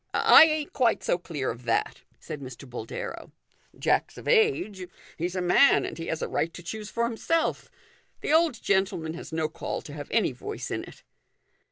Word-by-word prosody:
" - - -45 0.3
I - - +11
ain't 310 -2 -2
quite 240 -4 +2
so 175 - +1
clear 150 -6 -3
of 120 +1 -10
that," 115 -1 0 0.2
said 150 -2 -7
Mr. 130 +1 -9
Boldero. 120 -2 -6 0.5
"Jack's - - 0
of - - -10
age; 415 - +2 0.3
he's 175 +3 -3
a 185 - -1
man, 180 +10 +5
and - - -5
he 165 - -5
has 160 - -2
a - - -1
right 165 - -1
to 175 - -9
choose 210 +4 -6
for 235 - -1
himself. 240 +8 -1 0.5
The - - 0
old 320 -7 +3
gentleman 190 -5 0
has 170 - -9
no 160 -1 0
call 155 - -5
to 145 - -9
have 145 -1 -7
any 225 -9 +2
voice 125 - -6
in - - -2
it." - - -15
180 Hz, 195 wpm, -27 LUFS, 155-235 Hz, 0.5 s, I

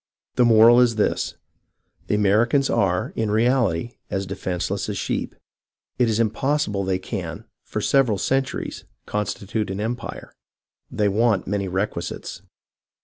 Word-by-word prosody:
" - - -57
The 125 - +5
moral 115 +1 +7
is 120 -2 +3
this: 105 - 0 0.7
The - - +1
Americans 110 +7 +3
are, 95 -5 +1
in 110 -2 -1
reality, 115 -2 +1
as 95 0 -2
defenceless 95 +2 -3
as 100 - -3
sheep; - - -3 0.6
it 120 -2 +3
is 110 0 0
impossible 115 -2 0
they 95 -1 0
can, 90 -4 -6 0.2
for - - -3
several 130 -7 +3
centuries, 135 +5 -2 0.2
constitute 105 +1 -2
an 95 +1 -4
empire; 115 +3 -5 0.6
they 105 - 0
want 105 0 +2
many 100 -1 -2
requi 95 -1 -1
sites. - - -7
105 Hz, 140 wpm, -23 LUFS, 95-120 Hz, 0.7 s, moral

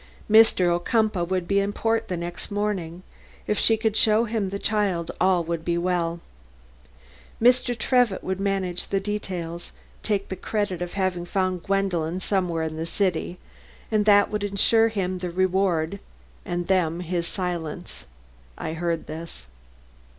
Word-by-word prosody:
Mr. 220 -4 +6
Ocumpaugh 210 0 +1
would 180 0 -2
be 200 +1 +3
in 200 +1 0
port 225 +2 0
the 180 - -3
next 175 +1 -6
morning; 190 -4 -2 0.4
if 210 - 0
she 225 - +5
could 220 -1 0
show 220 +1 +4
him 215 -4 -1
the 200 - -3
child 200 -6 0
all 185 -2 +3
would 165 0 -3
be 170 0 0
well. 170 -1 0 1.2
Mr. 245 0 +3
Trevitt 245 -4 +2
would 190 0 -2
manage 195 -3 -1
the 195 - 0
details; 180 -4 -4 0.3
take 200 -2 -1
the 190 - -3
credit 205 -3 -2
of 175 0 -4
having 185 -3 -1
found 185 -1 0
Gwendolen 185 -3 0
somewhere 180 -4 0
in 160 0 -4
this 165 +1 -4
great 200 - +4
city, 175 +2 -5 0.5
and 215 -1 +2
that 205 -1 +5
would 210 -1 -2
insure 205 +3 +3
him 185 -4 -2
the 180 0 -3
reward 185 -1 +1 0.5
and 175 0 -2
them 175 -2 +1
his 170 -1 -2
silence. 175 - -5 0.5
(I 160 - -4
heard 170 0 -2
this.) 160 - -8
185 Hz, 155 wpm, -25 LUFS, 175-205 Hz, 1.2 s, Mr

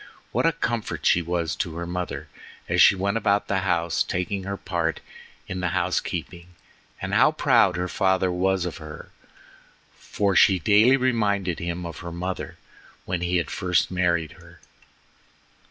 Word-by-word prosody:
What - - +1
a - - +4
comfort 120 -9 -3
she 90 - +4
was 85 -2 -2
to 80 -2 -3
her 85 +1 -4
mother 90 0 -4 0.4
as - - +2
she - - +7
went 100 +3 -1
about 100 -2 +1
the 95 - 0
house 85 -3 0
taking 95 +2 -2
her 100 0 -4
part 85 -5 -2 0.5
in 90 - -4
the 90 - -1
housekeeping, 85 -1 -3 0.5
and 95 +2 -5
how 130 +9 +5
proud 120 -11 +3
her 90 0 -1
father 95 -1 +1
was 95 0 0
of 90 - -5
her, 75 -1 -10 0.8
for 100 -2 -1
she 95 +2 +6
daily 105 - +5
reminded 100 -8 0
him 85 +1 -4
of 85 - -7
her 85 -1 -7
mother 90 +2 -5 0.5
when 90 -2 -2
he 90 +1 +1
had 85 - -2
first 90 -1 0
married 85 -3 0
her. - - -17
90 Hz, 160 wpm, -24 LUFS, 85-100 Hz, 0.8 s, she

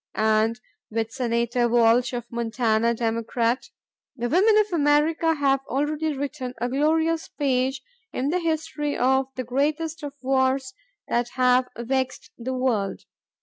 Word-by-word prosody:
And 220 +2 +2 0.3
with 225 0 -2
Senator 235 -1 0
Walsh 235 +1 +4
of 240 -1 -3
Montana, 235 -1 +1
Democrat, 230 +1 -1 0.5
"The 240 -2 -2
women 415 - +4
of 420 -3 +2
America 315 +1 +2
have 275 -2 +2
already 295 +2 -1
written 270 -3 -4
a 245 +2 -1
glorious 320 +4 +1
page 265 -1 -1 0.3
in 265 +3 -1
the 360 +4 +1
history 315 -3 -2
of 265 +1 +2
the 255 - -3
greatest 300 +6 -1
of 290 -2 -6
wars 260 0 +1 0.3
that 240 0 0
have 250 0 +3
vexed 260 +2 -2
the 260 +2 -3
world. 235 -6 -1
260 Hz, 135 wpm, -24 LUFS, 235-295 Hz, 0.5 s, Walsh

